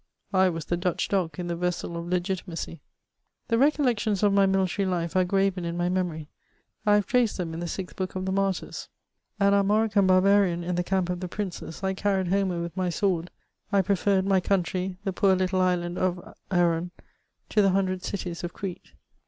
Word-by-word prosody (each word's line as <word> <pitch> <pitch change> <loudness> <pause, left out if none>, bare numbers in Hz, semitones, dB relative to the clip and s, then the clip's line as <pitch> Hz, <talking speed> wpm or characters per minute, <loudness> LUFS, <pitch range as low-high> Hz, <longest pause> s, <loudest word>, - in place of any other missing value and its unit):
I 190 -1 +5
was 165 -3 -4
the 175 - -1
Dutch 180 0 -1
dog 185 -5 0
in 180 - -3
the 170 0 -2
vessel 175 0 -2
of 170 0 -5
Legitimacy. 180 -2 -3 0.7
The 230 - +3
recoilections 245 -8 +2
of 205 -1 +4
my 200 -1 +5
military 190 0 +1
life 170 -2 -2
are 185 - +4
graven 195 0 +1
in 170 0 -3
my 175 0 0
memory; 175 -4 -2 0.6
I 205 - +6
have 205 -1 +2
traced 245 -3 +2
them 170 -3 -3
in 165 - -5
the 175 - -3
sixth 185 +2 -6
book 185 -1 -3
of 185 0 -3
the 190 - -1
Martyrs. 195 -1 -2 0.5
An 200 0 +4
Armorican 200 0 +3
barbarian 185 -1 +4
in 180 +1 -2
the 175 0 0
camp 185 -1 0
of 180 - -3
the 180 - -4
princes, 185 -2 -6
I 190 0 +1
car 200 +1 0
ried 185 -2 -1
Homer 190 -2 +1
with 170 0 -6
my 185 -2 0
sword; 175 -1 0 0.4
I 200 -2 +3
preferred 195 0 +2
my 195 -1 +3
country^ 185 0 -1
the 195 -2 -2
poor 190 0 +3
little 185 0 +1
island 180 -1 0
of 180 -1 -2 0.2
Aaron, 175 -2 +2 0.6
to 215 - +3
the 195 - +4
hundred 185 -1 0
cities 180 -3 -4
of 175 - -4
Crete. 190 -3 -7
185 Hz, 200 wpm, -26 LUFS, 175-195 Hz, 0.7 s, I